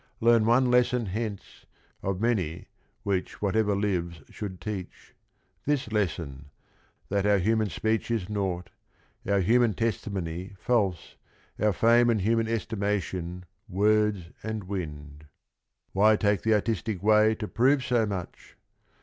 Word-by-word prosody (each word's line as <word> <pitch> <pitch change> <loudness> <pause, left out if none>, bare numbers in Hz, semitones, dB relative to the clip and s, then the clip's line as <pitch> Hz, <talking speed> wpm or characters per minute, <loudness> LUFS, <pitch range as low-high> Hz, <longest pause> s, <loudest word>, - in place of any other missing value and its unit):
learn 115 -1 +4
one 125 +2 +4
lesson 125 -1 +3
hence 105 +1 -5 0.3
Of 95 -1 -2
many 95 -8 -1 0.3
which 100 -3 -2
whatever 105 0 +1
lives 90 -5 -2
should 95 -4 -6
teach: 100 -4 -7 0.5
This 140 -6 0
lesson, 80 -9 -2 0.6
that 100 0 +1
our 105 -1 +4
human 110 +2 +1
speech 110 +9 -1
is 110 -6 -1
naught, 95 -4 -3 0.6
Our 100 -1 +3
human 115 +2 +3
testimony 95 -4 -3
false, 100 -8 0 0.4
our 105 +1 +3
fame 120 +4 +4
And 110 -3 +2
human 115 +3 +1
estimation 100 -5 -2 0.2
words 105 -2 +1
and 110 -1 -4
wind. 75 -6 -6 0.7
Why 105 +3 +5
take 105 -2 +1
the 110 -1 +3
artistic 105 -2 -2
way 110 +1 +5
to 105 -1 -5
prove 130 +4 +2
so 120 -3 +2
much? 95 -4 -7
105 Hz, 125 wpm, -27 LUFS, 95-110 Hz, 0.7 s, Why